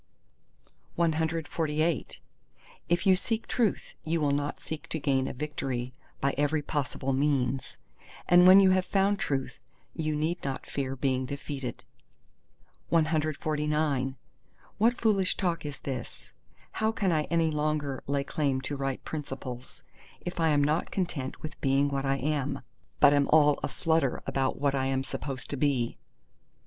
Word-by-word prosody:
CXLIX 160 -1 0 0.7
If 175 0 +1
you 190 -1 +6
seek 225 +4 -2
Truth, 230 -6 0
you 165 +1 0
will 145 -2 +2
not 145 +1 -1
seek 160 -2 -6
to 160 - -2
gain 135 -2 +1
a - - -4
victory 130 -3 -3 0.3
by 140 0 +1
every 145 +1 +1
possible 135 -2 -2
means; 135 -2 0 0.5
and 180 +1 +7
when 190 +1 +10
you 190 -1 +6
have 185 -1 +2
found 200 +1 +2
Truth, 135 -2 -2 0.3
you 155 -2 -1
need 160 +4 -1
not 135 -2 -3
fear 135 -1 -3
being 130 -1 0
defeated. 140 -2 -5 1.1
CL 165 -1 +4 1.8
What 235 +4 +3
foolish 200 -5 +2
talk 170 -5 -1
is 140 -2 -6
this? 130 -4 -7 0.4
how 220 0 0
can 195 -4 0
I 155 -2 +1
any 165 -2 +1
longer 150 -2 -1
lay 140 0 0
claim 140 -2 0
to 145 +2 -4
right 135 -1 -3
principles, 135 -4 -6 0.4
if 175 0 -5
I 165 - +3
am 145 -1 +3
not 150 +3 +1
content 160 -8 -3
with 155 0 -7
being 140 +1 +3
what 140 -1 -2
I 135 - +2
am, 140 -1 -1 0.4
but 145 - +7
am 145 -1 +3
all 150 -2 +5
aflutter 160 -5 0
about 135 -1 -1
what 140 -1 +2
I 135 -1 0
am 135 0 0
supposed 135 -1 -5
to 145 - -2
be? 130 -4 0
145 Hz, 150 wpm, -29 LUFS, 135-165 Hz, 1.8 s, when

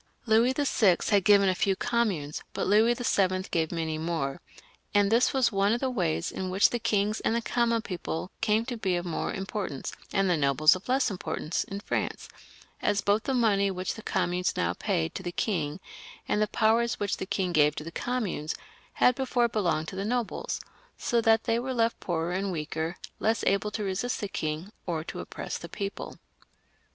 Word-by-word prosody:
Louis 230 +3 +4
YI. 225 -10 +4 0.2
had 200 -2 +4
given 200 -1 +6
a 185 - +3
few 195 +1 +1
communes, 200 -12 -1
but - - -1
Louis 220 +4 +4
VIL 190 -6 +1
gave 160 -2 0
many 160 -2 -2
more, 160 -5 -2 0.5
and 205 0 +4
this 235 +2 +4
was 265 -4 +2
one 200 +1 +2
of 240 - 0
the 265 0 -1
ways 175 -7 -1
in 185 -1 -4
which 190 +2 +4
the 240 - -1
kings 215 -1 +1
and 225 - 0
the 235 - +1
common 235 -1 +1
people 180 0 -4
came 215 +2 +2
to 245 -2 -4
be 190 -4 0
of 175 0 -2
more 170 - -2
importance, 195 - -4 0.2
and 195 0 +2
the 180 - +3
nobles 150 +3 +5
of 185 +6 -9
less 260 -2 +2
importance, 165 -2 -2
in 200 +1 -6
France, - - -3 0.5
as 200 - +1
both 205 +2 +1
the 270 - 0
money 205 -5 +3
which 185 -1 -3
the 220 - -9
communes 180 -3 0
now 85 0 +1
paid 80 -2 -1
to - - -5
the 175 -2 -4
king, 170 -5 -1 0.5
and 210 - +1
the 215 - +3
powers 230 +2 +2
which 205 -1 -1
the 190 - -5
king 185 -3 -1
gave 150 -1 +4
to - - -5
the 165 - -7
communes, 205 -10 -2 0.4
had 250 - +4
before 250 -2 +1
belonged 170 -9 0
to - - -8
the 195 - -2
nobles, 235 +1 -2 0.4
so 235 -1 +1
that 225 -1 +4
they 230 +1 +1
were 260 +1 -3
left 230 0 +1
poorer 170 -1 -2
and 190 +2 -1
weaker, 160 +1 -3 0.2
less 225 0 +1
able 200 +2 +2
to 210 0 -4
resist 200 +6 -2
the 205 - -2
king 155 +1 -3 0.2
or 165 -3 -1
to - - -7
oppress - - -5
the - - -8
people. 200 -1 -5
200 Hz, 200 wpm, -28 LUFS, 175-225 Hz, 0.5 s, given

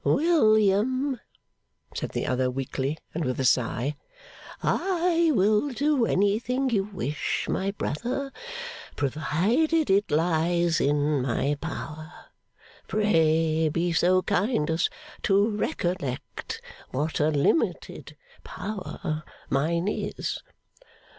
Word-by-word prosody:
'William,' 255 - +3 0.7
said - - -3
the - - -3
other 130 0 +1
weakly, 135 +3 -2 0.2
and 165 - -2
with 130 -2 -2
a 135 - +1
sigh, 125 +3 +1 0.7
'I 345 -3 +2
will 210 +7 +3
do 275 -1 +1
anything 235 +7 +1
you 200 -4 +2
wish, 155 -7 -2
my 190 +1 0
brother, 245 - -3 0.6
provided 195 - +1
it 200 +2 +3
lies 165 +1 +2
in 145 0 +2
my 135 +3 0
power. 155 +1 -6 0.8
Pray 160 -6 +2
be 170 +2 0
so 185 +3 +3
kind 180 -6 +1
as 165 +2 +1 0.3
to 200 +2 +3
recollect 175 -9 -3 0.3
what 150 +5 -2
a 150 - +3
limited 150 - 0 0.3
power 185 -6 -5 0.3
mine 170 +6 +1
is. 210 - -2
175 Hz, 100 wpm, -26 LUFS, 150-215 Hz, 0.8 s, William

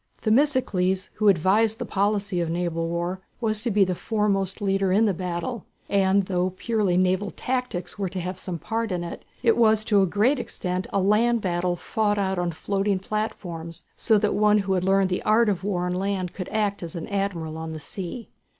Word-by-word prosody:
Themistocles, 215 -7 +2
who 215 - +2
had 200 - +7
advised 210 +7 +2
the 245 - -4
policy 200 -3 0
of 170 - -1
naval 165 -1 -1
war, 175 +2 -2 0.2
was 215 -3 0
to 240 - -1
be 205 -2 +4
the 185 -1 0
foremost 200 -1 0
leader 195 -2 +1
in 210 +4 +4
the 205 - +2
battle, 180 +6 -4 0.3
and 195 0 +3
though 185 0 -1
purely 210 -6 +1
naval 185 +2 +2
tactics 250 -2 -3
were 195 -2 -1
to 190 +1 -5
have 180 +1 -4
some 180 -3 -4
part 225 +4 -3
in 175 -1 -2
it, 170 - -7 0.2
it 230 -2 +4
was 220 -2 +4
to 215 - -4
be 205 - +7
to - - +5
a 190 - +3
great 225 - +2
extent 185 -5 -3
a 200 - +1
land 220 +5 +3
battle 175 -2 0
fought 205 +3 0
out 190 -2 0
on 175 0 0
floating 195 +4 -1
platforms, 180 -5 -5
so 220 -3 +3
that 210 0 +1
one 210 0 +4
who 190 - +1
had 180 -1 0
learned 195 0 +3
the 180 - 0
art 220 +1 +3
of 190 -3 -1
war 185 -3 -1
on 180 - -1
land 185 -1 -2
could 185 - -6
act 210 -2 -1
as 170 -1 -6
an 165 - -5
admiral 195 -6 -2
on 160 0 -5
the 155 - -6
sea. 190 +8 -6
195 Hz, 215 wpm, -25 LUFS, 180-215 Hz, 0.3 s, had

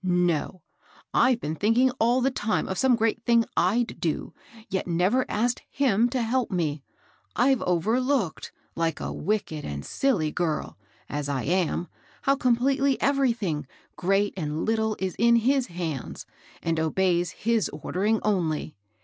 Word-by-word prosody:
No 180 -1 0 0.5
I - - +5
I've 235 - -4
been 150 - -2
thinking 225 +9 +3
all 240 +3 +3
the 270 +2 +2
time 215 -3 -1
of 190 - -3
some 260 -2 +4
great 225 0 0
thing 235 -1 +3
Pd 225 +7 +1
do, 160 -3 -2 0.3
yet 190 - -2
never 185 +9 +1
asked 240 +3 0 0.2
JBSm 240 -4 +3
to 250 -1 -1
help 245 +2 0
me 155 -6 -1 0.3
\ - - -36
I've 260 +1 +3
overlooked, 220 - 0 0.2
like 165 -1 -1
a - - -4
wicked 195 -7 -2
and 70 0 -5
sQly 185 - 0
girl, 160 -4 -2 0.3
as 145 0 -3
I 135 -3 -1
am, 175 -1 0 0.4
how 275 - +3
completely 270 +2 +2
everything, 230 - 0 0.3
great 195 +2 +1
and 155 -3 -3
little, 220 -1 +1
is 190 -2 -2
in 235 +1 +5
his 255 +3 +2
hands, 170 -6 -5 0.4
and 165 -1 0
obeys 175 +2 +1
his 225 +3 0
ordering 200 +8 -1
only. 165 -7 0
205 Hz, 150 wpm, -26 LUFS, 170-240 Hz, 0.5 s, I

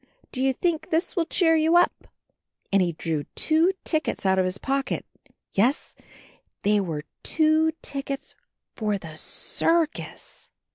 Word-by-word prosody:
Do 255 - -2
you 265 0 +3
think 325 +4 -1
this 330 +6 0
will 335 -3 +1
cheer 325 -3 +3
you 320 +2 +4
up 350 - +2 0.3
?" - - -23
And 195 - +5
he 175 -2 +1
drew 155 -2 -2
two 320 +4 +3
tickets 315 - -1
out 190 0 +3
of 185 - +3
his 185 +1 -1
pocket 275 +4 -2 0.3
— - - -50 0.2
^yes, 245 +9 +2 0.7
they 210 +1 +3
were 160 -6 -3 0.2
two 315 0 +3
tickets 275 -1 -5 0.4
for 210 -3 -1
the 160 -4 -10
circus! 330 - -1
275 Hz, 150 wpm, -25 LUFS, 195-320 Hz, 0.7 s, And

